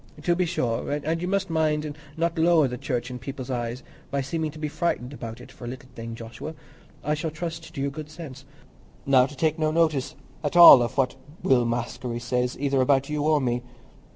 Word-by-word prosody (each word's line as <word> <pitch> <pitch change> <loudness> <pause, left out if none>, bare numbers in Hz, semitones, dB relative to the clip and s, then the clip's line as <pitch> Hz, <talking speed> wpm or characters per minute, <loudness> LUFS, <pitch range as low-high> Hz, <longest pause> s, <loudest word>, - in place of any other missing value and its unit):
"To 175 +1 +2
be 180 0 +1
sure; 125 -10 -1
and 155 +3 -1
you 180 - -2
must 190 -1 0
mind 155 -1 +1
and 145 -1 -5 0.2
not 165 0 0
lower 165 -3 +5
the 125 - -4
Church 125 -2 -3
in 125 - -6
people's 130 0 -6
eyes 120 +1 -3 0.3
by 140 - -1
seeming 155 +4 -2
to 155 - -11
be 155 0 -2
frightened 145 -4 -2
about 115 -3 -7
it - - -12
for 120 - -11
a - - -5
little 130 +1 -8
thing, 115 0 -7
Joshua. 115 +7 -8 0.5
I 150 - 0
shall 155 +2 -2
trust 165 +1 -6
to - - -5
your 140 0 -1
good 150 +1 -7
sense, 150 -4 -9 0.6
now 130 -2 +5
to 145 - -12
take 160 +2 +1
no 155 -1 +2
notice 155 -4 +1 0.3
at 145 +2 -2
all 170 -7 +11
of 120 +2 -2
what 135 0 +1 0.3
Will 125 -2 +4
Maskery 120 +1 -3
says, 125 +1 -1
either 140 -1 +2
about 135 +1 +2
you 150 -1 -1
or 155 0 +3
me. 120 -2 0
140 Hz, 215 wpm, -25 LUFS, 125-155 Hz, 0.6 s, all